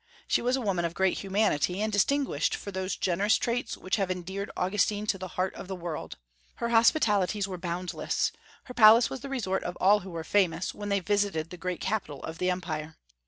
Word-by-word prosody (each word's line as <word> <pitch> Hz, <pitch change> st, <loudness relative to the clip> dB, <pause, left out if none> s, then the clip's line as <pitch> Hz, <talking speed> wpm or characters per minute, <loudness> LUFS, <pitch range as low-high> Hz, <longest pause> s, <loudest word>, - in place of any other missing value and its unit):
She -, -, +2 dB
was 250 Hz, +2 st, +1 dB
a 265 Hz, -, -2 dB
woman 190 Hz, -6 st, 0 dB
of 170 Hz, 0 st, -2 dB
great 190 Hz, -1 st, +1 dB
humanity, 195 Hz, -3 st, +1 dB
and 215 Hz, 0 st, -1 dB
distinguished 230 Hz, -, +1 dB
for 200 Hz, -, -7 dB
those 190 Hz, 0 st, -2 dB
generous 195 Hz, +4 st, +2 dB
traits 240 Hz, +1 st, -2 dB
which 185 Hz, +3 st, -1 dB
have 195 Hz, -3 st, 0 dB
endeared 190 Hz, +2 st, -4 dB
Augustine 205 Hz, +2 st, +1 dB
to 195 Hz, -2 st, 0 dB
the 185 Hz, -, -5 dB
heart 185 Hz, +1 st, 0 dB
of -, -, -9 dB
the 190 Hz, -, -4 dB
world. 170 Hz, -, -6 dB, 0.4 s
Her 235 Hz, -, -2 dB
hospitalities 215 Hz, -, +3 dB
were 185 Hz, -2 st, -6 dB
boundless; 175 Hz, +1 st, -2 dB, 0.3 s
her 250 Hz, -, -10 dB
palace 230 Hz, 0 st, +7 dB
was 265 Hz, -, -4 dB
the 275 Hz, -, -8 dB
resort 200 Hz, -8 st, -1 dB
of 175 Hz, -, -5 dB
all 205 Hz, +3 st, +5 dB
who 195 Hz, -1 st, -10 dB
were 165 Hz, -2 st, -5 dB
famous, 180 Hz, -2 st, +1 dB
when 205 Hz, 0 st, -6 dB
they 200 Hz, -1 st, +1 dB
visited 195 Hz, -4 st, 0 dB
the -, -, -6 dB
great 180 Hz, 0 st, -4 dB
capital 190 Hz, -9 st, -3 dB
of 160 Hz, +1 st, -6 dB
the 185 Hz, -, +1 dB
empire. 160 Hz, -4 st, -3 dB
190 Hz, 210 wpm, -28 LUFS, 180-210 Hz, 0.4 s, palace